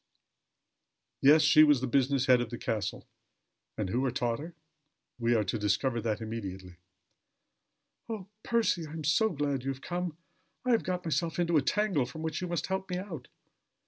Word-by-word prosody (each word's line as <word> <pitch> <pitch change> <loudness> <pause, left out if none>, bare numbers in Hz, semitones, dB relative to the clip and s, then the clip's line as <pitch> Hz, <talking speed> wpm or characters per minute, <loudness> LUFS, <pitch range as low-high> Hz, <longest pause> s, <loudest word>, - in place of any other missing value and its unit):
Yes, 150 +3 +7
she 155 +1 +7
was 145 -3 +5
the 130 - -2
business 135 +1 +2
head 125 -2 +5
of 120 - -3
the 120 - -5
castle. 105 -4 -3 0.7
And - - -2
who 125 +3 +1
had 125 -2 -2
taught 120 -3 0
her? 165 +3 -8 0.6
We 120 0 +2
are 110 - +2
to 105 +3 -2
discover 115 +4 0
that 110 -1 -2
immediately. 95 -5 -6 1.3
"Oh, 215 -4 -4 0.2
Percy! 220 -9 +1
I 150 - -10
am 160 -1 -5 0.3
glad 140 -3 -1
you 135 - -2
have 135 -1 -4
come. 175 -2 -3 0.5
I 250 - +2
have 230 - +4
got 180 -1 -3
myself 160 +1 -1
into 170 -1 +1
a 150 - +5
tangle 185 -5 +1
from 160 +5 -8
which 160 +1 -3
you 180 - -2
must 170 -3 -2
help 190 0 -3
me 180 - -2
out." 175 -9 -7
140 Hz, 180 wpm, -30 LUFS, 120-170 Hz, 1.3 s, Yes